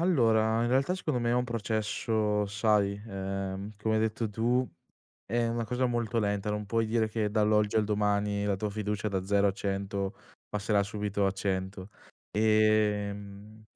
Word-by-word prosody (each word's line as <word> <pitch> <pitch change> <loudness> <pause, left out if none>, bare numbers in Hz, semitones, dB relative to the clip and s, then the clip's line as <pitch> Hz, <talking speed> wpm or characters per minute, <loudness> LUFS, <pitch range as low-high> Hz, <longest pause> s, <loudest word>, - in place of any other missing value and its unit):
allora, 115 -9 +3
in 120 - +1
realtà 135 +8 +2
secondo 155 -9 -2
me 120 0 +1
è - - +2
un 125 0 +2
processo, 110 -2 0
sai, 100 -1 +1
ehm, 95 0 -4
come 110 +1 0
hai 110 - +2
detto 110 0 -1
tu, 120 +4 +1 0.6
è 120 +2 0
una 115 0 -1
cosa 125 +3 0
molto 120 -1 -1
lenta, 105 -1 0
non 105 0 -3
puoi 115 +2 +1
dire 110 0 +1
che 110 -1 -1
dall'oggi 105 -1 +2
al 110 - +3
domani 105 -1 0
la 100 -1 +1
tua 105 +2 -2
fiducia 105 0 -2
da 95 -2 -2
0 100 +1 +3
a - - 0
100 100 0 -3 0.4
passerà 105 0 +1
subito 100 0 -2
a - - +2
100 95 0 -3 0.5
ehm, 105 -1 +1
105 Hz, 165 wpm, -29 LUFS, 100-110 Hz, 0.6 s, allora